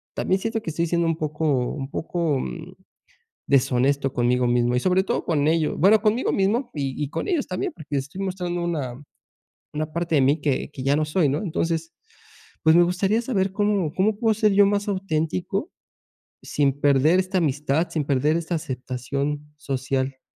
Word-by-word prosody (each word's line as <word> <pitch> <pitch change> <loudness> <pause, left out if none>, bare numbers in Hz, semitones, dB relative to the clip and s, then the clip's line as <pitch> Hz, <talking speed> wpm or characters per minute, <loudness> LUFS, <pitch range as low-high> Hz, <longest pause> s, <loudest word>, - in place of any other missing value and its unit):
también 190 +1 0
siento 225 -1 -2
que 165 - -4
estoy 170 +2 -1
siendo 170 0 +1
un 165 - +1
poco 155 0 -2 0.3
un 135 -2 -5
poco, 165 -4 -1
mm, 170 +4 -6 0.7
deshonesto 135 0 +2
conmigo 125 0 +2
mismo 120 0 +2
y - - +3
sobre 185 +1 +2
todo - - -1
con 150 -3 +1
ellos, 160 -1 +1
bueno, 205 +5 +5
conmigo 225 +3 +1
mismo 225 +6 0
y 135 -2 -2
y 140 - -3
con - - -3
ellos 345 -8 0
también, 185 - -2
porque 150 -4 -4
estoy 145 +8 -5
mostrando 180 -2 -3
una, 140 -8 -3 0.8
una 155 +1 -3
parte 170 -1 -2
de - - +5
mí 140 +3 +4
que 140 0 -1
que 130 - -7
ya 140 +1 +3
no 155 - +1
soy, 150 0 +1
¿no?, 140 - 0
entonces, 165 -2 -2 0.7
pues, 160 +1 +5
me 175 - +7
gustaría 195 +5 +1
saber, 195 -6 0
¿cómo 200 -6 0
cómo 205 +2 +1
puedo 225 -2 +2
ser 215 -1 +2
yo 200 +1 +6
más 205 0 0
auténtico 185 - -2 0.7
sin 145 -2 +1
perder 145 +5 +4
esta 190 0 0
amistad, 150 +1 0
sin 155 -3 -1
perder 145 +3 +2
esta 170 +1 -3
aceptación 140 +2 -4
social? 135 -2 -2
160 Hz, 180 wpm, -24 LUFS, 140-190 Hz, 0.8 s, me